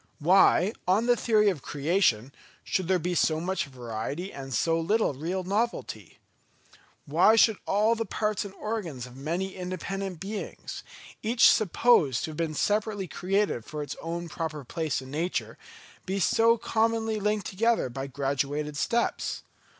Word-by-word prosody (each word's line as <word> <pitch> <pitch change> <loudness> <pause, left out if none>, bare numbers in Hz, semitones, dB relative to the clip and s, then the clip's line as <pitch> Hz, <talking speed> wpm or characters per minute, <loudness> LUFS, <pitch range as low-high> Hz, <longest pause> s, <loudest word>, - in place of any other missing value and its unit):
Why, 185 +4 +4
on 200 +5 +3
the 245 0 +4
theory 215 -3 +3
of 160 -8 -7
Creation, 140 - +1 0.3
should 190 -4 -1
there 190 0 +3
be 180 +1 -2
so 160 -2 +2
much 175 -1 -2
variety 130 - -5
and 135 -1 -8
so 165 +8 +1
little 205 +1 +1
real 170 +7 -3
novelty? 210 +6 -3 0.9
Why 170 +9 +5
should 220 -2 +5
all 215 +3 +3
the 230 0 -1
parts 210 +1 -1
and 200 - -8
organs 185 - -4
of 125 0 -13
many 170 +8 -3
independent 185 0 -4
beings, 205 +3 -6 0.4
each 230 +2 +5
supposed 190 - +3
to 160 - -3
have 150 - -10
been 160 -2 -2
separately 205 +1 0
created 190 - -1
for 150 +4 -5
its 145 - -6
own 170 +1 -4
proper 155 -3 -5
place 155 -2 -2
in 130 - -11
nature, 165 +5 -2 0.5
be 195 +1 -1
so 230 +5 +4
commonly 225 -1 0
linked 210 0 0
together 225 - +1
by 135 +2 -5
graduated 140 +2 -2
steps? 235 +9 -1
180 Hz, 150 wpm, -27 LUFS, 150-210 Hz, 0.9 s, Why